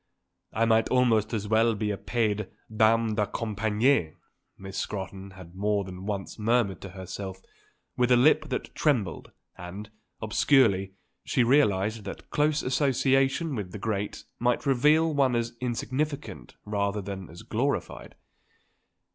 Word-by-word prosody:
"I 115 +2 +1
might 115 0 +3
almost 115 -4 +3
as 105 -3 -2
well 110 +1 +3
be 105 0 -1
a - - -1
paid 105 0 -1 0.3
dame 110 +1 +3
de 105 -1 0
compagnie," 110 - +1 0.4
Miss 95 0 -9
Scrotton 95 -1 -5
had 85 -2 -12
more 100 +1 0
than 95 +1 -8
once 100 +1 -4
murmured 110 -2 +1
to 100 - -7
herself 95 0 -6 0.6
with 125 0 +2
a 125 - +7
lip 140 +6 +4
that - - -4
trembled; 120 - 0 0.3
and, 100 +5 -8 0.3
obscurely, 105 -4 +3 0.3
she 125 - +1
realised 110 -5 +2
that 100 - -8
close 150 0 +1
association 135 +3 +1
with 100 -7 -5
the - - -5
great 105 -1 -3 0.2
might 120 +3 +1
reveal 150 +4 +3
one 135 -4 +2
as 120 0 -1
insignificant 135 +4 -3
rather 100 0 -1
than 95 -1 -6
as 85 +6 -11
glorified. 115 - -2
110 Hz, 140 wpm, -27 LUFS, 100-125 Hz, 0.6 s, a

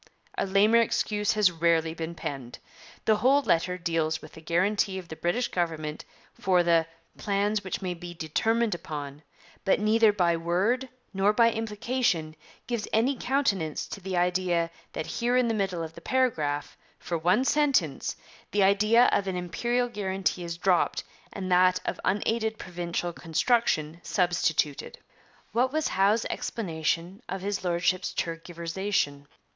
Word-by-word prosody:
A - - -1
lamer 210 +4 +5
excuse 210 -2 0
has 210 -4 +4
rarely 165 -1 +1
been 165 +1 -5
penned. 135 -6 -6 0.5
The 215 -1 +4
whole 270 +6 +4
letter 180 -1 +1
deals 165 -2 -1
with 155 - -12
the 160 - -12
guarantee 190 +4 +1
of 180 -2 -8
the 160 - -6
British 175 +10 -1
government 160 -3 -3 0.3
for 180 -2 +2
'the 165 -1 +3 0.3
plan 205 +1 0
which 195 -1 -4
may 180 -1 -1
be 175 0 -9
determined 220 +8 0
upon,' 150 -4 -6 0.5
and 205 +2 +3
neither 220 0 +5
by 175 -4 +2
word 195 +11 0 0.2
nor 195 +2 +3
by 230 +1 +5
implication 220 -7 -1 0.3
gives 235 -3 -3
any 245 +6 +2
countenance 205 - 0
to 200 - -7
the 185 -1 -3
idea 175 -1 +1 0.2
that 155 - -3
here 245 +1 0
in 250 -1 +3
the 225 - +1
middle 190 -5 -1
of 160 0 -7
the 170 - -12
paragraph, 160 - 0 0.2
for 170 - -4
one 185 +10 +2
sentence, 270 - +1 0.3
the 205 -1 +2
idea 210 +4 +5
of 195 - +1
an 190 - -2
Imperial 240 +8 -1
guarantee 190 -4 -2
is 170 -1 -5
dropped 180 -1 +1 0.3
and 185 -1 -5
that 185 0 +5
of - - -3
unaided 220 +2 0
provincial 175 -1 -4
construction 165 -2 0
substituted. 175 -6 0 0.5
What 245 +5 +2
was 310 +1 0
Howe's 205 +4 +2
explanation 170 0 -2
of 190 +1 -4
his 200 0 -2
Lordship's 180 +1 0
tergiversation? 165 -2 -2
185 Hz, 150 wpm, -27 LUFS, 170-215 Hz, 0.5 s, lamer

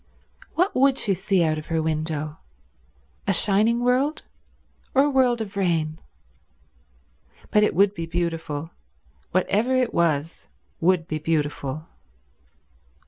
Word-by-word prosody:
What 360 +4 +2
would 270 +1 +4
she 200 - +1
see 190 0 +1
out 155 -1 0
of 155 - -11
her 165 -1 0
window? 155 -1 -2 0.9
A 195 - +3
shining 215 +6 +3
world, 260 +5 +1 0.7
or 270 - +6
a 290 - +2
world 250 -3 +2
of 205 -2 -6
rain? 165 -5 0 1.5
But 210 - +4
it 210 - +2
would 200 +2 +4
be 165 -4 -5
beautiful; 165 -2 -3 0.6
whatever 210 +7 +1
it 255 -2 +1
was 165 -1 0 0.3
would 170 -1 +2
be 155 - -3
beautiful. 150 -1 -2
175 Hz, 125 wpm, -24 LUFS, 160-220 Hz, 1.5 s, or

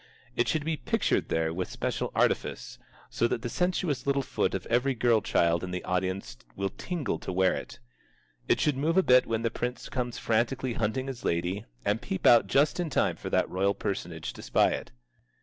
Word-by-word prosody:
It 120 - +2
should 155 -2 0
be 160 -1 -1
pictured - - 0
there 80 0 0
with 90 +2 -3
special - - -2
artifice, - - 0 0.3
so 115 - +2
that 115 - -2
the 120 - -2
sensuous 180 -2 -1
little 140 0 +2
foot - - -1
of - - -4
every 125 +3 +1
girl 115 -2 +3
child 85 -4 +2
in 90 - -4
the 90 0 -4
audience 95 -5 -2 0.2
will 100 -1 -2
tingle 165 - -3
to - - -5
wear 95 0 +3
it. - - -6 0.7
It - - +3
should 150 -3 +1
move 160 +6 +1
a 190 - +6
bit 125 -3 +5
when 115 0 -1
the 115 - +1
prince 125 +1 -4
comes 125 -2 -3
frantically 120 +3 0
hunting 115 +4 -1
his 135 -3 -6
lady, 90 +4 -1 0.2
and 105 +3 +1
peep 95 - -4
out 115 -4 +7
just 140 - +2
in 175 -2 -1
time 130 - +1
for - - -6
that - - +2
royal 100 +2 +1
personage 85 -4 -4
to - - -10
spy - - +3
it. - - -4
115 Hz, 200 wpm, -28 LUFS, 95-135 Hz, 0.7 s, out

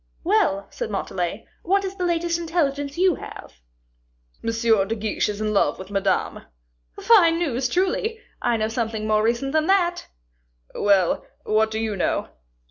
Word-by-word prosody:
"Well," 195 +1 +2
said - - -4
Montalais, 190 -1 -3
"what 395 +2 +1
is 385 0 -5
the 365 - -2
latest 340 0 0
intelligence 290 -4 -1
you 365 -3 +3
have?" - - -10 0.8
"M. - - -1 0.4
de 225 - -1
Guiche 215 -1 -1
is 205 0 -4
in 215 0 -1
love 200 - +2
with 190 +1 -10
Madame." 195 -2 -1 0.5
"Fine 340 -8 +5
news, 265 -7 -1
truly! 385 - 0 0.2
I 235 - +1
know 215 0 0
something 225 -1 -3
more 215 0 +2
recent 235 +5 0
than 315 0 +2
that." 355 -2 +2 0.7
"Well, 195 -4 +2 0.2
what 215 +1 +2
do 220 - -4
you 220 -2 -2
know?" 185 - -1
235 Hz, 155 wpm, -23 LUFS, 215-340 Hz, 0.8 s, Fine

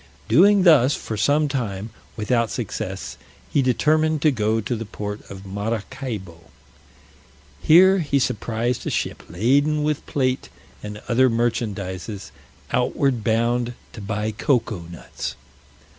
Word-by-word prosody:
Doing 200 +3 +5
thus, 145 -6 +6
for 110 - -5
some 145 +8 +2
time, 110 -6 -3 0.3
without 115 +1 +1
success, - - -5 0.4
he 140 - +4
determined 155 +4 +2
to 155 - +5
go 110 -2 0
to 110 +3 -2
the 115 - -4
port 105 0 -6
of 95 0 -9
Maracaibo. 100 -3 -5 1.2
Here 190 +4 +6
he 145 -4 +1
surprised 115 -1 -1
a - - +1
ship - - -2
laden 140 - +2
with 150 -1 -1
plate, 130 -2 -1 0.3
and 105 0 -8
other 130 +2 +4
merchandises, 105 -4 -2 0.4
outward 130 -6 +1
bound, 120 +2 +1 0.2
to 110 - -8
buy 105 +1 -2
cocoa 115 - 0
nuts. 85 - -6
115 Hz, 125 wpm, -22 LUFS, 105-140 Hz, 1.2 s, thus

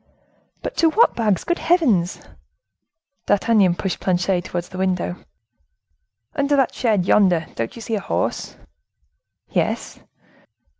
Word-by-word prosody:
"But - - -4
to 330 - +4
what 445 +9 +3
bags, 215 -5 +1
good 345 +1 -1
heavens!" 245 - +2 1.1
D'Artagnan 205 -4 +3
pushed 190 +1 -3
Planchet 180 0 0
towards 175 -1 -4
the 185 - -8
window. 185 -1 -1 1.1
"Under 285 0 +1
that 270 -3 +2
shed 215 -7 +1
yonder, 180 -5 +3
don't 115 0 -4
you 230 - -9
see 225 - -4
a 215 - +1
horse?" - - -2 0.9
"Yes." - - -2
195 Hz, 120 wpm, -21 LUFS, 180-245 Hz, 1.1 s, to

